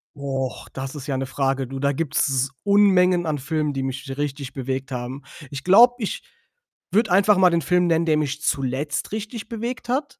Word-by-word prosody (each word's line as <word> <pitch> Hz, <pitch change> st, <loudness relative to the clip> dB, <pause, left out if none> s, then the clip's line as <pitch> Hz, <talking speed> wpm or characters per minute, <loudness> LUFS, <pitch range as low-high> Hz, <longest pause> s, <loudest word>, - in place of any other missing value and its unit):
Och, 135 Hz, -2 st, -4 dB
das 135 Hz, +2 st, -6 dB
ist 145 Hz, 0 st, -8 dB
ja 135 Hz, -, -1 dB
'ne 135 Hz, -, -2 dB
Frage. 135 Hz, 0 st, -1 dB
Du, 135 Hz, +1 st, -6 dB
da 140 Hz, 0 st, +1 dB
gibt's 135 Hz, -3 st, 0 dB
Unmengen 185 Hz, -4 st, +4 dB
an 155 Hz, -2 st, -1 dB
Filmen, 150 Hz, +1 st, -1 dB
die 135 Hz, -1 st, -2 dB
mich 135 Hz, +1 st, -5 dB
richtig 140 Hz, -2 st, -4 dB
bewegt 135 Hz, +1 st, -4 dB
haben. 125 Hz, +2 st, -5 dB, 0.3 s
Ich 140 Hz, 0 st, -7 dB
glaube, 235 Hz, +7 st, +7 dB
ich 210 Hz, -, -3 dB, 0.7 s
würde 220 Hz, -1 st, +2 dB
einfach 200 Hz, +2 st, +5 dB
mal 185 Hz, -1 st, +6 dB
den 170 Hz, -1 st, +1 dB
Film 180 Hz, +1 st, +2 dB
nennen, 165 Hz, 0 st, +2 dB
der 155 Hz, -2 st, +3 dB
mich 150 Hz, 0 st, -2 dB
zuletzt 135 Hz, +4 st, -2 dB
richtig 220 Hz, +1 st, -5 dB
bewegt 235 Hz, +1 st, -5 dB
hat. 270 Hz, +4 st, -2 dB
150 Hz, 190 wpm, -23 LUFS, 135-185 Hz, 0.7 s, glaube